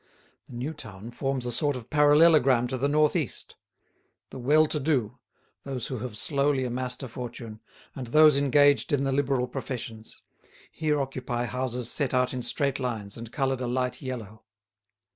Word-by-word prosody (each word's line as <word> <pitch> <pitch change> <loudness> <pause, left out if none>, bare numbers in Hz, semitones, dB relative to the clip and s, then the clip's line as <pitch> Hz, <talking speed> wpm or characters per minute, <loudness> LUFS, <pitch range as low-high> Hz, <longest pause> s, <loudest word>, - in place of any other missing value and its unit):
The - - -13
new 130 +6 -3
town 110 -5 -10
forms 135 0 -2
a 120 - -2
sort 145 +4 0
of 125 -2 -9
parallelogram 145 -4 +5
to 130 - -2
the 140 - +1
north 150 +1 +3
east; - - -4 0.8
the 130 - -8
well 150 +5 +4
to 150 0 -2
do, 130 -7 -1 0.4
those 130 -4 -5
who 130 - -4
have 115 -2 -6
slowly 140 0 +1
amassed 125 +1 -3
a - - -4
fortune, 115 -2 -8 0.3
and 130 -3 -6
those 155 +4 +6
engaged 145 0 +4
in 140 -2 +2
the 135 - 0
liberal 135 -2 +1
professions, 120 -3 -7 0.5
here 150 -2 0
occupy 125 -3 -3
houses 125 0 -3
set 140 -3 0
out 125 0 +1
in 125 - -3
straight 140 +3 0
lines 110 -6 -4
and 115 -1 -9
coloured 135 -2 -1
a 125 - -2
light 125 +1 -2
yellow. 115 -5 -7
130 Hz, 170 wpm, -27 LUFS, 120-145 Hz, 0.8 s, those